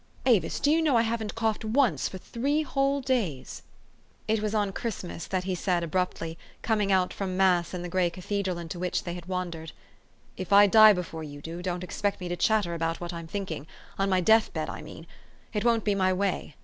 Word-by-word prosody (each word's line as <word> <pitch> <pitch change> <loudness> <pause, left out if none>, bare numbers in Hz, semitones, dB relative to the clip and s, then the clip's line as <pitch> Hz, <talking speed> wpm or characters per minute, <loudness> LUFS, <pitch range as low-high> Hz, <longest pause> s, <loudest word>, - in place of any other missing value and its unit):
Avis, 215 -11 +2
do 290 - +3
you 325 +1 +3
know 300 -5 +2
I 230 - +4
haven't 225 -2 -2
coughed 225 -2 -1
once 235 +2 +2
for 190 - -7
three 280 +10 -1
whole 275 -1 0
days?" 205 - -2 0.7
It 220 0 +1
was 215 0 -1
on 205 -2 +1
Christmas 190 -8 -5
that 185 -1 -1
he 190 0 -2
said 180 -1 0
abruptly, 165 -1 -2 0.2
coming 210 -3 +1
out 185 -1 +2
from 185 -2 -3
mass 180 -3 +3
in 180 -1 -5
the - - -4
gray 180 0 +1
cathedral 185 +1 -3
into 170 +1 -6
which 180 0 -1
they 175 - -4
had 175 -1 -8
wandered, 175 -4 -4 0.6
"If 185 +1 -6
I 200 +1 +8
die 215 +1 +8
before 175 -3 -5
you 145 -1 -8
do, 165 +4 -7
don't 180 0 -3
ex 180 - -7
pect 205 -1 0
me 180 - -5
to 175 - -1
chatter 205 -2 +1
about 165 0 -2
what 175 0 -5
I'm 170 -1 -7
thinking, 165 -5 -5 0.3
on 195 0 +1
my 185 -1 +3
death 220 +4 +4
bed, - - -3
I - - -7
mean. - - -10 0.5
It 210 - -1
won't 235 -2 +2
be 205 - +2
my 190 -1 +2
way. 185 -5 -2
190 Hz, 215 wpm, -27 LUFS, 175-220 Hz, 0.7 s, I